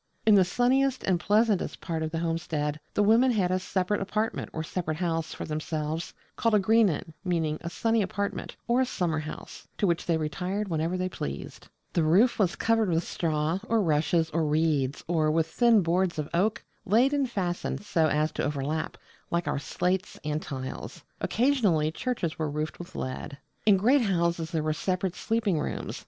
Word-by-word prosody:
In 220 - +6
the 195 -2 +7
sunniest 255 +7 +2
and 185 -2 +1
pleasantest 210 +1 +2
part 165 -1 -3
of 160 - -1
the 165 - -3
homestead 165 -3 -2 0.2
the 205 - +3
women 230 +5 +5
had 195 -7 +1
a 185 - +2
separate 185 +2 -1
apartment 215 +3 -2
or 160 - -3
a - - -5
separate 155 -2 -3
house 165 -2 -1
for - - -5
themselves, 155 +1 -3 0.2
called 230 -2 +2
a - - +5
'Greenan' 195 -6 +2
meaning 165 -4 0
a 170 - -4
'sunny 225 +5 +1
apartment' 200 +1 -3
or 240 +2 +3
a - - +3
summer 165 -7 -1
house; 155 0 -8
to - - +1
which 170 -2 0
they 165 -2 +2
retired 185 +6 -2
whenever 165 +2 -1
they 185 0 -1
pleased. 70 - -6 0.3
The 170 - +2
roof 190 +12 +4
was 190 -4 +2
covered 225 -3 +2
with 165 0 +1
straw, 160 +1 -1
or 230 0 +2
rushes, 160 -2 +2
or 165 +1 +1
reeds, 150 -3 +1
or 160 -2 +2
with 160 +1 +2
thin 225 +4 +4
boards 175 +1 +1
of 150 -1 -2
oak, 200 +6 +1 0.2
laid 235 +7 +3
and 280 -3 +1
fastened 180 -3 -2
so 160 -5 +2
as 155 +1 +1
to - - -3
overlap, 150 +2 -2 0.3
like 170 0 -1
our - - 0
slates 180 +5 -2
and 150 0 -1
tiles. 130 -2 -6 0.2
Occasionally 210 - +2
churches 175 -5 -3
were 155 -1 0
roofed 150 +1 -3
with 175 +1 -10
lead. 130 +2 -5 0.3
In 200 -2 +7
great 255 +9 +4
houses 170 -5 0
there 160 -3 -1
were 155 0 +1
separate 185 +2 -1
sleeping 215 -5 0
rooms. - - -4
175 Hz, 185 wpm, -28 LUFS, 155-205 Hz, 0.3 s, the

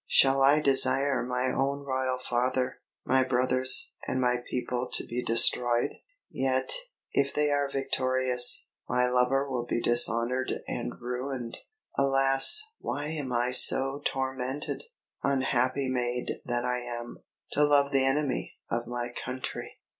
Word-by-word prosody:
"Shall 135 0 +4
I 140 +3 +5
desire 135 -1 +3
my 125 +1 -2
own 140 +2 -2
royal 130 -1 -2
father, 125 +1 -2 0.3
my 130 0 +2
brothers, 130 0 +2
and 130 - -2
my 125 -1 +1
people 125 0 -3
to - - +2
be 120 +1 -4
destroyed? 120 +1 +2 0.4
Yet, 130 0 0 0.4
if 140 0 -1
they 150 0 +1
are 145 -1 0
victorious, 130 -2 +3 0.2
my 125 0 +1
lover 125 +2 +1
will 125 -3 -4
be 120 - -1
dishonoured 120 +2 +2
and - - -5
ruined! 125 0 -5 0.4
Alas, 135 - +5 0.2
why 145 +1 -4
am 150 -5 -5
I 120 +1 -1
so 135 +2 +4
tormented! 130 - -4 0.4
Unhappy 135 -1 0
maid 125 -1 -3
that 120 0 -2
I 125 0 -1
am, 120 -1 -7 0.3
to 150 - +2
love 145 -1 +3
the 135 -1 +3
enemy 135 +1 -1 0.2
of 120 0 -3
my 120 0 -4
country!" 130 +1 -7
130 Hz, 135 wpm, -27 LUFS, 125-135 Hz, 0.4 s, I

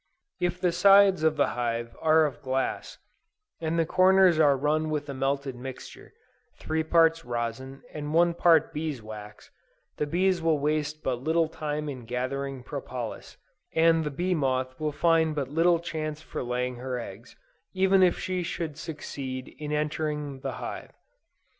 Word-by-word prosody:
If 180 0 -1
the 180 -1 +2
sides 195 +1 +6
of 155 -1 +2
the - - +3
hive 115 -1 -3
are 160 0 +5
of 145 -2 -5
glass, 130 -1 -2 0.6
and 160 0 -1
the 165 - +3
corners 185 -1 +5
are 145 -3 +5
run 155 +3 0
with 150 -1 -2
a - - -3
melted 135 0 -1
mixture, 130 +1 -9 0.4
three 160 0 -2
parts 165 0 +3
rosin, 120 +3 -4
and 150 -1 -5
one 170 +2 +4
part 165 -2 +4
bees 150 -3 -3
wax, 105 -1 -10 0.5
the 150 - -1
bees 180 +2 +1
will 165 -2 +2
waste 150 +1 -1
but 125 -2 -1
little 160 +3 +2
time 150 -1 -4
in 130 -5 -6
gathering 130 +2 -3
propolis, 125 -4 -6 0.4
and 165 0 +4
the 150 - -2
bee 175 +6 -1
moth 130 -4 -1
will 155 -1 -1
find 160 0 +2
but 140 -3 -2
little 170 +3 +3
chance 155 -2 -4
for - - -6
laying 125 0 -2
her 125 0 -4
eggs, 115 +1 -10 0.4
even 190 0 +4
if 180 -1 +4
she 185 -1 -2
should 160 -3 -4
succeed 135 -5 -6
in 150 -1 -5
entering 150 -2 -2
the - - -4
hive. - - -7
150 Hz, 160 wpm, -27 LUFS, 130-165 Hz, 0.6 s, sides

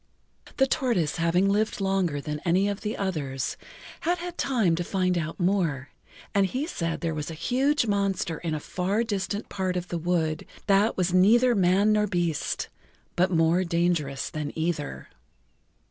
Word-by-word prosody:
The 270 - +5
tortoise 230 - 0
having 170 +3 +2
lived 210 +2 +1
longer 190 -6 0
than 150 +1 -4
any 185 +3 +2
of 200 0 -3
the 215 0 -3
others, 145 -10 -2 0.4
had 350 +2 0
had 350 0 -6
time 225 - +1
to 175 - -1
find 185 0 0
out 165 +1 -3
more, 175 -8 0 0.4
and 200 -1 +3
he 260 +9 -2
said 165 - -3
there 165 -2 -1
was 150 0 -4
a 165 - -6
huge 265 - +1
monster 200 -5 0
in 165 -3 -2
a - - -2
far 190 +8 -1
distant 205 -1 -3
part 185 -2 -2
of 180 0 -4
the 170 - -2
wood 160 -2 -1 0.2
that 200 +2 +3
was 180 -1 +1
neither 235 +7 +5
man 195 +1 +3
nor 210 0 +2
beast, 175 -5 -1 0.5
but 180 +2 +3
more 165 +1 +3
dangerous 170 -5 0
than 150 -2 -4
either. 160 -2 -2
180 Hz, 165 wpm, -26 LUFS, 165-205 Hz, 0.5 s, The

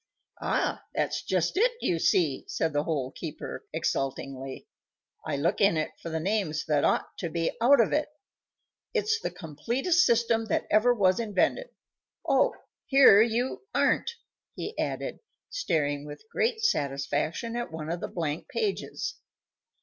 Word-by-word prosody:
"Ah! - - 0
that's - - 0
just - - 0
it, 480 +4 +4
you 170 - 0
see," 155 -5 +2
said 160 -2 -1
the 145 +1 0
Hole 140 -5 -1
keeper, 155 -1 -7
exultingly; 135 -3 -3 0.6
"I 150 -2 -1
look 160 +8 0
in 200 -5 +4
it 155 - -1
for 170 - -5
the 160 0 -2
names 180 -4 -1
that 150 -2 +2
ought - - +1
to 170 - -2
be 165 0 -1
out 265 +3 +6
of 230 - +3
it. 300 0 +1 0.9
It's 440 0 +1
the - - -2
completest 240 - 0
system 230 -1 +2
that - - 0
ever 215 +4 +5
was 190 -5 +3
invented. 230 - 0 0.6
Oh! - - +3 0.3
here 265 -7 +8
you 240 - 0
aren't!" 470 - +2 0.4
he 435 - -5
added, - - -3 0.3
staring 145 - -1
with 145 +8 -10
great 455 -1 0
satisfaction 150 - -1
at 240 -5 -3
one 160 0 -5
of 170 - -2
the - - -4
blank 160 -3 -3
pages. 420 -4 -2
180 Hz, 150 wpm, -28 LUFS, 150-245 Hz, 0.9 s, here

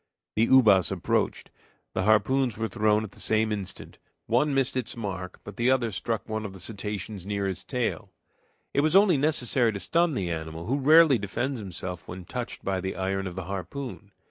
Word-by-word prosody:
The 115 +2 +3
ubas 105 - +5
approached, - - -1 0.4
the 95 - -1
harpoons 110 +3 +3
were 115 0 -1
thrown 110 -1 +2
at 105 - -7
the - - -16
same 110 0 +1
instant; 100 -3 -5 0.3
one 135 +6 +2
missed 135 -2 +1
its 125 -2 -3
mark, 95 -4 -5
but 100 - -10
the 120 +2 +2
other 125 -4 +2
struck 110 +3 -3
one 110 -1 -3
of 100 -3 -6
the 95 - -11
cetaceans 100 -1 -5
near 100 -1 -1
his 95 -2 -2
tail. 125 -3 -3 0.6
It 140 - +3
was 155 +4 +2
only 195 -5 +6
necessary 130 -5 +2
to 100 - -4
stun 170 - +1
the 90 -7 -2
animal, 80 0 -5
who 135 +4 0
rarely 155 -2 +6
defends 120 +7 -2
himself 90 -2 -6
when 90 0 -8
touched 125 +2 -5
by 95 -1 0
the 95 +1 -3
iron 95 0 -2
of 90 - -7
the 95 - -4
harpoon. 100 - -6
110 Hz, 195 wpm, -27 LUFS, 95-130 Hz, 0.6 s, only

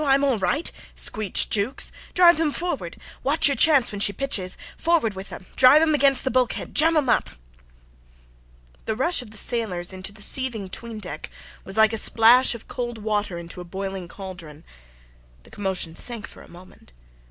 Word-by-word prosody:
I 275 -2 +4
am 275 - 0
all 265 -6 +1
right," 190 - 0 0.2
screeched 215 -3 0
Jukes. 215 +6 -1 0.2
"Drive 345 -2 +6
them 320 -2 +1
forward. 350 +4 -4 0.2
Watch 290 +4 +3
your 280 - +1
chance 285 -6 +4
when 205 - -6
she 205 - +3
pitches. 195 -5 -1 0.2
Forward 325 -11 +1
with 190 +1 -9
'em. 185 - -9
Drive 260 +3 +7
them 315 -1 +2
against 275 -2 +3
the 265 - -1
bulkhead. 255 -2 -1
Jam 320 +2 +3
'em 290 -3 +1
up." 245 - +1 1.6
The 220 - -2
rush 305 +7 +1
of 245 - -12
the 220 - -10
sailors 200 -7 0
into 190 +1 -4
the 210 0 -7
seething 230 -6 0
'tween 230 +3 -7
deck 180 -7 -8 0.3
was 195 +2 -7
like 220 0 +5
a 225 - +1
splash 235 +4 +5
of 230 - -12
cold 240 -2 -5
water 210 -4 -2
into 170 +1 -9
a - - -7
boiling 190 0 -6
cauldron. 170 -5 -10 0.8
The - - -17
commotion 190 -5 -3
sank 235 -3 -1
for - - -14
a - - -16
moment. 175 - -17
220 Hz, 185 wpm, -23 LUFS, 190-270 Hz, 1.6 s, Drive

